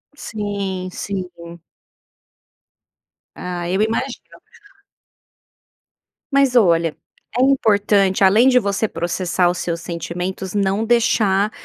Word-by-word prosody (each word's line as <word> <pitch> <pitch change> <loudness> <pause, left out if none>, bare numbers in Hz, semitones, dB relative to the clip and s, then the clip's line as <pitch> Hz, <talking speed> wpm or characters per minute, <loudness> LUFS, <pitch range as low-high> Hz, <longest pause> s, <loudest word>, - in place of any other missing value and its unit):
Sim, 200 -7 -4
sim. 190 -1 -5 2.1
Ah, 175 -1 -5
eu 190 +3 0
imagino. 230 +4 -3 1.9
Mas 275 -2 +3
olha, 170 -8 +3 0.4
é - - +2
importante, 205 -7 +3
além 210 +6 +5
de 250 -1 +5
você 205 0 -1
processar 175 0 0
os 175 - -2
seus 170 -1 -3
sentimentos, 175 +3 -5
não 200 +1 0
deixar, 215 -3 +2
195 Hz, 95 wpm, -19 LUFS, 180-220 Hz, 2.1 s, além